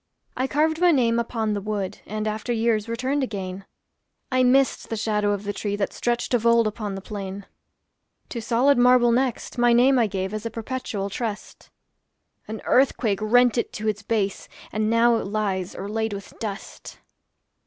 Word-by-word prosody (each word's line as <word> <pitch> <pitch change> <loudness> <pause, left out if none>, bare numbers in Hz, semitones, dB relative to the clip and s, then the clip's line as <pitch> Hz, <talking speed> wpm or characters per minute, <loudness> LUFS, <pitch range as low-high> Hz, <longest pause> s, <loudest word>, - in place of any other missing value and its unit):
I 260 +1 0
carved 315 +4 +1
my 355 - +6
name 235 -5 +2
upon 225 -2 -1
the 205 - -2
wood, 200 -1 -3
And, 215 0 -3
after 215 +3 -3
years, 225 -1 +1
returned 260 +5 -1
again; 195 -6 -4 0.7
I 255 0 +3
missed 260 +2 +3
the 225 - -2
shadow 210 -1 0
of 200 0 -2
the 205 0 -3
tree 205 0 -3
That 205 -1 -2
stretched 240 +1 -1
of 240 -2 +2
old 235 -1 +4
upon 210 -2 -3
the 195 - -7
plain. 200 -1 -6 0.8
To 235 - -5
solid 245 +4 +3
marble 245 -1 +5
next, 250 0 -1
my 240 0 +5
name 255 +2 +5
I 230 - +3
gave 190 0 -3
as 215 0 -4
a 230 - -3
perpetual 225 -3 -4
trust; 215 -1 -5 0.8
An 220 0 -6
earthquake 245 -6 +2
rent 245 +2 +4
it - - -2
to 215 0 -4
its 210 -1 -1
base, 205 -2 -1 0.2
And 215 0 0
now 230 +1 +4
it - - -3
lies, 195 -3 -2
o'erlaid 220 +2 -3
with 200 0 -8
dust. 205 -3 -7
220 Hz, 175 wpm, -24 LUFS, 205-240 Hz, 0.8 s, my